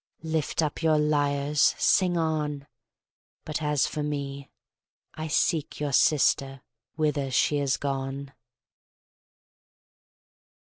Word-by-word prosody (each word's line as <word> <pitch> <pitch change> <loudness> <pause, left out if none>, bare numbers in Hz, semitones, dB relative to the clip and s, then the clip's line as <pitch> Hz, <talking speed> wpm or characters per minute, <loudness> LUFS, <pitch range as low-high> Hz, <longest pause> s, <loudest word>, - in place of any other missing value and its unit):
Lift 160 0 -1
up 150 +1 -3
your 160 -2 +3
lyres! 145 -1 +2
Sing 180 -2 +3
on! 150 -3 -1 0.8
But 155 0 -3
as 150 -2 +1
for 150 - -4
me, 140 -2 -4 0.6
I 155 0 -5
seek 155 0 0
your 145 -2 -2
sister 135 -2 +2 0.3
whither 150 -3 0
she 140 +3 +2
is 140 -2 0
gone. 135 0 -4
145 Hz, 100 wpm, -26 LUFS, 140-155 Hz, 0.8 s, your